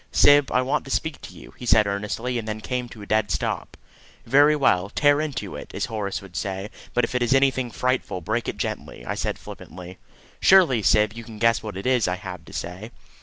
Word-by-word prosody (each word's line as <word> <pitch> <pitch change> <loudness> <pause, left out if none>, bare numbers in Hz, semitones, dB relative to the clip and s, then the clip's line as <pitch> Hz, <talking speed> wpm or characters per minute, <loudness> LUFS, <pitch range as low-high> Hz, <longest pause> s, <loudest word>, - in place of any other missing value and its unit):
"Syb, 145 -1 +5
I 125 - +2
want 130 - 0
to - - -9
speak 160 +2 -2
to - - -11
you," - - -13
he 125 - -7
said 105 -2 +5
earnestly, 105 +5 -2
and 110 - -7
then 110 0 -3
came 125 +2 -3
to 110 -3 -11
a - - -8
dead 110 0 +1
stop. - - -3 0.5
"Very 145 +5 +5
well; 95 -10 +2
'tear 145 +5 +3
into 155 -3 -4
it,' - - -9
as - - -1
Horace 105 -6 -4
would 95 -3 -13
say; 95 +3 -4 0.2
but 120 - +3
if 115 - -1
it 125 - 0
is 120 +2 +3
anything 135 -2 +2
frightful, 125 -5 -1
break 110 +7 -2
it - - -3
gently," - - -5
I - - -2
said - - -2
flippantly. 90 +1 -11 0.4
"Surely, 175 - +5
Syb, 105 +1 +3
you 115 +1 -8
can 110 -1 -11
guess 115 +1 +3
what 105 -3 -6
it 95 - -6
is 125 -5 +2
I 90 - 0
have 90 -2 -8
to - - -13
say." 90 +6 -6
115 Hz, 225 wpm, -24 LUFS, 100-130 Hz, 0.5 s, Syb